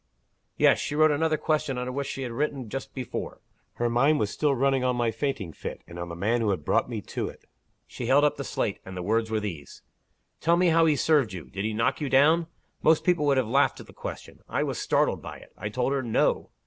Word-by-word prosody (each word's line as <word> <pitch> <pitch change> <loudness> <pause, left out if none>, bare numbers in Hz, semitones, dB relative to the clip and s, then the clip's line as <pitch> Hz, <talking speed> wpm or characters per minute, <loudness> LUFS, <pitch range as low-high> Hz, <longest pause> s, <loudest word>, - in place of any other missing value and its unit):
"Yes. - - +5
She 145 - -3
wrote 155 0 +5
another 155 +1 +1
question 150 -3 0
under 125 +1 -3
what 140 +1 -3
she 135 - -4
had 125 - -4
written 135 -1 -2
just 135 +4 -5
before. 130 -2 -5 0.3
Her 120 - -1
mind 135 +6 +3
was 105 -1 0
still 145 -2 +1
running 135 0 +2
on 125 -1 +1
my 120 -1 +1
fainting 110 - -3
fit, - - -7
and 85 - -10
on 85 0 -5
the 85 - -6
'man' 110 +7 0
who 110 - +1
had 90 -7 -2
'brought - - +2
me - - -4
to - - -4
it.' - - -15 0.4
She 120 - -6
held 140 +3 +5
up 150 0 +3
the 140 - -5
slate; 105 -5 -2
and 95 -1 -8
the 90 - -4
words 110 +3 +1
were 110 -1 0
these: 85 -9 -7 0.6
'Tell 170 +1 +3
me 180 0 +4
how 165 0 +4
he 155 - +4
served 145 -7 +2
you, 90 -3 -8
did 100 +1 -3
he 110 - -1
knock 115 +7 0
you 145 - -1
down?' 155 +5 +4 0.3
Most 160 0 +4
people 175 -5 +2
would 140 -1 +3
have 130 -4 +1
laughed 140 +5 +2
at - - -10
the - - -16
question. - - -8
I - - 0
was - - -3
startled - - +1
by - - -8
it. - - -17
I 105 - -5
told 125 +4 0
her, 140 - 0
No. 115 -3 +1
130 Hz, 250 wpm, -27 LUFS, 110-145 Hz, 0.6 s, Yes